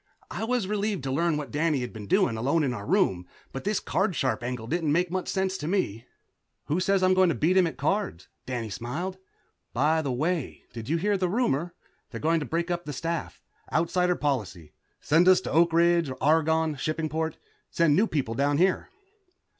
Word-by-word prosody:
I 225 Hz, -, -3 dB
was 245 Hz, -3 st, 0 dB
relieved 205 Hz, -4 st, -1 dB
to 135 Hz, -, -2 dB
learn 165 Hz, +3 st, +1 dB
what 145 Hz, -6 st, -5 dB
Danny 150 Hz, -2 st, +1 dB
had 125 Hz, -, -5 dB
been 105 Hz, -2 st, -8 dB
doing, 115 Hz, -, +2 dB
alone 140 Hz, +8 st, +1 dB
in 130 Hz, -3 st, 0 dB
our 100 Hz, -4 st, -7 dB
room, 115 Hz, -, +1 dB, 0.2 s
but 135 Hz, -, -7 dB
this 210 Hz, 0 st, +1 dB
card 190 Hz, -2 st, 0 dB
sharp 130 Hz, -4 st, 0 dB
angle 120 Hz, -2 st, -4 dB
didn't 160 Hz, +3 st, -1 dB
make 175 Hz, +3 st, +1 dB
much 185 Hz, 0 st, -2 dB
sense 190 Hz, -1 st, -1 dB
to 150 Hz, -, -4 dB
me. 125 Hz, -, -1 dB, 0.6 s
"Who 155 Hz, +5 st, 0 dB
says 195 Hz, 0 st, +2 dB
I'm 185 Hz, 0 st, +5 dB
going 185 Hz, -1 st, +4 dB
to 165 Hz, -, 0 dB
beat 170 Hz, +5 st, +2 dB
him 185 Hz, -2 st, +5 dB
at 160 Hz, -, -6 dB
cards?" 150 Hz, -, -1 dB, 0.4 s
smiled 140 Hz, -, -4 dB
Danny. 190 Hz, -, -33 dB, 0.5 s
"By 155 Hz, +5 st, +2 dB
the 140 Hz, -4 st, -2 dB
way, 155 Hz, +3 st, -2 dB
did 115 Hz, +1 st, -7 dB
you 165 Hz, -, +2 dB
hear 200 Hz, +4 st, +1 dB
the 185 Hz, -1 st, 0 dB
rumor? 175 Hz, -, 0 dB, 0.3 s
They're -, -, -7 dB
going 165 Hz, +2 st, +2 dB
to 145 Hz, -, -5 dB
break 170 Hz, +5 st, -1 dB
up 175 Hz, 0 st, -2 dB
the 145 Hz, -, -5 dB
staff, 165 Hz, +4 st, -4 dB, 0.3 s
Outsider 180 Hz, +2 st, +1 dB
policy, 105 Hz, -, -3 dB, 0.3 s
send 165 Hz, +4 st, +3 dB
us 185 Hz, -1 st, +7 dB
to -, -, -5 dB
Oak 170 Hz, +1 st, +4 dB
Ridge, 170 Hz, -2 st, +3 dB
Argonne, 160 Hz, 0 st, +2 dB
Shippingport, 155 Hz, +2 st, -2 dB, 0.3 s
send 165 Hz, -3 st, +3 dB
new 210 Hz, +6 st, +3 dB
people 135 Hz, -, -2 dB
down 140 Hz, +4 st, +1 dB
here." 185 Hz, +3 st, +1 dB
160 Hz, 200 wpm, -27 LUFS, 140-180 Hz, 0.6 s, us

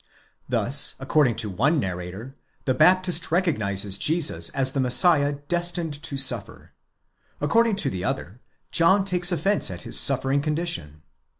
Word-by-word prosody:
Thus, 140 Hz, +3 st, +1 dB
according 135 Hz, -2 st, +1 dB
to 105 Hz, -, -3 dB
one 140 Hz, -, +1 dB
narrator, 95 Hz, +5 st, -6 dB, 0.3 s
the 130 Hz, -, +1 dB
Baptist 180 Hz, +3 st, +2 dB
recognizes 105 Hz, -, -1 dB
Jesus 160 Hz, -1 st, +1 dB
as 130 Hz, -1 st, 0 dB
the 135 Hz, -, -3 dB
Messiah 145 Hz, +3 st, +4 dB
destined 175 Hz, -4 st, -3 dB
to 140 Hz, -3 st, -5 dB
suffer; 125 Hz, -5 st, 0 dB, 0.7 s
according 225 Hz, +9 st, +1 dB
to 160 Hz, -8 st, 0 dB
the 90 Hz, -1 st, -5 dB
other, 90 Hz, -, -5 dB, 0.3 s
John 190 Hz, +4 st, +3 dB
takes 180 Hz, -1 st, +1 dB
offence 195 Hz, +4 st, 0 dB
at 90 Hz, -2 st, -8 dB
his -, -, +2 dB
suffering 135 Hz, +1 st, +1 dB
condition. 150 Hz, -, -4 dB
145 Hz, 135 wpm, -23 LUFS, 115-175 Hz, 0.7 s, Messiah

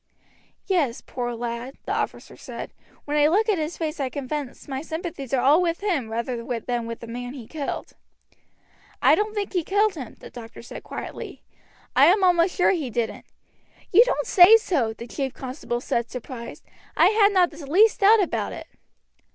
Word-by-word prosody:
"Yes, 315 Hz, -11 st, 0 dB
poor 240 Hz, -1 st, -4 dB
lad," 235 Hz, +2 st, -5 dB
the -, -, -2 dB
officer -, -, -4 dB
said. -, -, -8 dB, 0.3 s
"When 295 Hz, -, -2 dB
I 295 Hz, 0 st, +5 dB
look 410 Hz, +8 st, +2 dB
at 410 Hz, -6 st, +2 dB
his 310 Hz, +2 st, -3 dB
face 315 Hz, -1 st, -3 dB
I 270 Hz, -2 st, -1 dB
confess 280 Hz, 0 st, -5 dB
my 270 Hz, -1 st, -4 dB
sympathies 320 Hz, -4 st, -6 dB
are 260 Hz, -3 st, +1 dB
all 295 Hz, +6 st, +5 dB
with 340 Hz, 0 st, -1 dB
him 335 Hz, -, -1 dB
rather 235 Hz, +2 st, -3 dB, 0.3 s
than 240 Hz, -2 st, -2 dB
with 230 Hz, 0 st, -6 dB
the -, -, -7 dB
man 245 Hz, +2 st, -6 dB
he 245 Hz, -5 st, -9 dB
killed." 290 Hz, +3 st, -5 dB, 1.1 s
"I -, -, +5 dB
don't 425 Hz, +1 st, 0 dB
think 410 Hz, -1 st, -3 dB
he 355 Hz, -3 st, +1 dB
killed 410 Hz, +4 st, +2 dB
him," 265 Hz, -9 st, -8 dB
the -, -, -12 dB
doctor 230 Hz, -1 st, -10 dB
said -, -, -9 dB
quietly. -, -, -8 dB, 0.5 s
"I -, -, +7 dB
am 385 Hz, +2 st, +4 dB
almost 355 Hz, 0 st, +3 dB
sure 360 Hz, -, +4 dB
he 315 Hz, -9 st, -2 dB
didn't." 235 Hz, -1 st, -3 dB, 0.7 s
"You 430 Hz, +6 st, +8 dB
don't -, -, -1 dB
say 410 Hz, 0 st, +8 dB
so!" 295 Hz, -, 0 dB
the 225 Hz, +1 st, -9 dB
chief 265 Hz, +2 st, -4 dB
constable 255 Hz, -2 st, -4 dB
said, 235 Hz, -1 st, -1 dB
surprised. 240 Hz, -2 st, -8 dB, 0.3 s
"I -, -, +6 dB
had 425 Hz, -1 st, +4 dB
not 365 Hz, -3 st, +3 dB
the 310 Hz, 0 st, -11 dB
least 410 Hz, +9 st, +4 dB
doubt 415 Hz, +1 st, +6 dB
about -, -, -2 dB
it." -, -, -8 dB
295 Hz, 185 wpm, -24 LUFS, 245-370 Hz, 1.1 s, You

